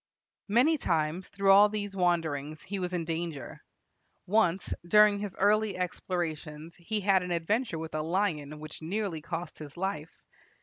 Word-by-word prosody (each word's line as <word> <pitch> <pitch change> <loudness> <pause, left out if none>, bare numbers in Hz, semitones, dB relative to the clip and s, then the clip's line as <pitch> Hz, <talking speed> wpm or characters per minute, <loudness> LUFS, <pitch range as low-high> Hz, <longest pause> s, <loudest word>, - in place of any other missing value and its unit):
Many 255 +9 +3
times 165 0 -1
through 195 -1 +3
all 205 +2 +8
these 205 -2 -4
wanderings 160 -5 0
he 200 0 -4
was 180 -1 -2
in 175 -2 -2
danger. 165 -5 -4 0.6
Once, 190 -3 +1
during 210 +3 +5
his 205 -2 -5
early 210 +1 +2
explorations, 170 -3 -4
he 210 +5 -2
had 195 -1 +4
an 180 - -5
adventure 175 +4 0
with 160 0 -6
a 155 - -1
lion, 155 -4 -1
which 155 +1 -9
nearly 180 -1 -2
cost 165 +1 -6
his 150 +1 -10
life. 175 -4 -4
180 Hz, 155 wpm, -29 LUFS, 160-200 Hz, 0.6 s, all